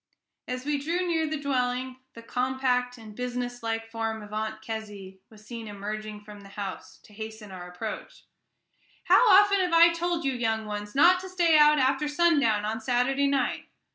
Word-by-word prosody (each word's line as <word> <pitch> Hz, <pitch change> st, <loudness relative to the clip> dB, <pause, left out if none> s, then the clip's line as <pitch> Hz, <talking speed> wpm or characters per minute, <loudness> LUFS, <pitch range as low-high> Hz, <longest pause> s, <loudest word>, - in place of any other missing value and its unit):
As 255 Hz, +1 st, -5 dB
we 295 Hz, -1 st, 0 dB
drew 340 Hz, +6 st, -1 dB
near 325 Hz, -2 st, 0 dB
the 310 Hz, -1 st, -3 dB
dwelling, 255 Hz, -2 st, -2 dB, 0.2 s
the 230 Hz, -, -11 dB
compact 250 Hz, 0 st, -1 dB
and 220 Hz, -2 st, -12 dB
businesslike 245 Hz, -2 st, -4 dB
form 225 Hz, -1 st, -3 dB
of 210 Hz, 0 st, -12 dB
Aunt 220 Hz, 0 st, -3 dB
Kezzy 205 Hz, -4 st, -7 dB
was 215 Hz, -1 st, -17 dB
seen 230 Hz, -1 st, -8 dB
emerging 210 Hz, +1 st, -6 dB
from 205 Hz, 0 st, -12 dB
the 200 Hz, -, -14 dB
house 200 Hz, -1 st, -7 dB
to 210 Hz, -, -18 dB
hasten 220 Hz, -1 st, -8 dB
our 180 Hz, -1 st, -8 dB
approach. 215 Hz, +5 st, -7 dB, 0.8 s
"How 485 Hz, -, +5 dB
often 400 Hz, 0 st, +6 dB
have 360 Hz, -2 st, 0 dB
I 335 Hz, +1 st, +7 dB
told 340 Hz, -1 st, -2 dB
you, 270 Hz, -, +1 dB
young 225 Hz, -3 st, -1 dB
ones, 210 Hz, +1 st, -6 dB
not 350 Hz, +6 st, +6 dB
to 375 Hz, +1 st, -8 dB
stay 345 Hz, -3 st, +3 dB
out 300 Hz, 0 st, +6 dB
after 270 Hz, +2 st, +1 dB
sundown 290 Hz, -10 st, +2 dB
on 220 Hz, +1 st, -3 dB
Saturday 255 Hz, +4 st, +1 dB
night? 275 Hz, -2 st, -1 dB
245 Hz, 175 wpm, -27 LUFS, 215-295 Hz, 0.8 s, I